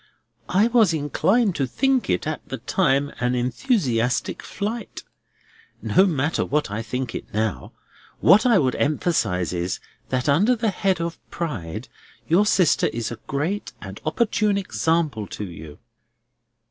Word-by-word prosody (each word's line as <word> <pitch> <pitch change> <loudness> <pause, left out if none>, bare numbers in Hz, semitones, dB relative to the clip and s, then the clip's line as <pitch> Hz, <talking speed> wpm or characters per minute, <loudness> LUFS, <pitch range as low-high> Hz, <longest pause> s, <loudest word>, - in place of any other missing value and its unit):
"I 200 +4 +4
was 225 -8 +4
inclined 185 - +1
to 135 - 0
think 270 - +1
it - - 0
at - - -3
the - - -3
time 145 -6 +1
an 125 0 +1
enthusiastic 125 - 0
flight. 220 +3 -5 0.8
No 190 +2 +3
matter 150 -2 0
what 150 -7 -1
I 105 +2 -2
think 125 +2 -4
it - - -7
now. 110 0 -2 0.5
What 210 +4 +6
I 240 -4 +5
would 130 -7 +2
emphasise 140 - 0
is, 90 +1 -2 0.3
that 130 0 -1
under 195 - +4
the 225 -2 0
head 190 -2 0
of 170 0 -3
Pride 115 - -5 0.4
your 190 +6 +4
sister 185 -6 +3
is 115 0 -3
a 120 - -7
great 145 -1 -2
and 95 0 -9
opportune 210 +4 +1
example 155 - 0
to 105 - -6
you." 80 -4 -10
150 Hz, 145 wpm, -23 LUFS, 120-200 Hz, 0.8 s, What